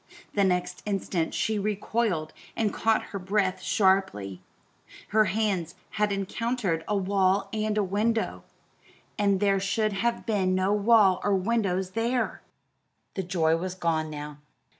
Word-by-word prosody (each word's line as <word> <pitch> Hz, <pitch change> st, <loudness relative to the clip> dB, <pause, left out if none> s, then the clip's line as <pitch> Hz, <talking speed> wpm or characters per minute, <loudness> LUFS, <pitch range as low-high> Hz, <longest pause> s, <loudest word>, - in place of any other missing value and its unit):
The 200 Hz, -, +2 dB
next 180 Hz, -1 st, 0 dB
instant 190 Hz, -4 st, -1 dB
she 215 Hz, -1 st, 0 dB
recoiled 205 Hz, -5 st, -1 dB, 0.2 s
and 215 Hz, -2 st, 0 dB
caught 225 Hz, -1 st, +2 dB
her 200 Hz, -, -3 dB
breath 190 Hz, -1 st, 0 dB
sharply; 185 Hz, -, +1 dB, 0.7 s
her 215 Hz, +1 st, +4 dB
hands 195 Hz, -6 st, -1 dB, 0.2 s
had 210 Hz, -1 st, 0 dB
encountered 200 Hz, -3 st, -1 dB
a 210 Hz, -, +1 dB
wall 195 Hz, 0 st, +1 dB
and 215 Hz, -1 st, -1 dB
a 210 Hz, -, +3 dB
window 215 Hz, +4 st, -1 dB, 0.8 s
and 200 Hz, -2 st, +3 dB
there 195 Hz, -1 st, +2 dB
should 205 Hz, +2 st, 0 dB
have 235 Hz, +4 st, -1 dB
been 190 Hz, -4 st, +1 dB
no 185 Hz, +2 st, +2 dB
wall 210 Hz, -3 st, +4 dB
or 200 Hz, -, +2 dB
windows 190 Hz, -2 st, 0 dB
there! 235 Hz, +4 st, -1 dB, 0.7 s
The 190 Hz, -, -2 dB
joy 170 Hz, -3 st, +1 dB
was 185 Hz, +2 st, -4 dB
gone 160 Hz, -3 st, 0 dB
now. 150 Hz, -1 st, -7 dB
195 Hz, 140 wpm, -27 LUFS, 185-215 Hz, 0.8 s, her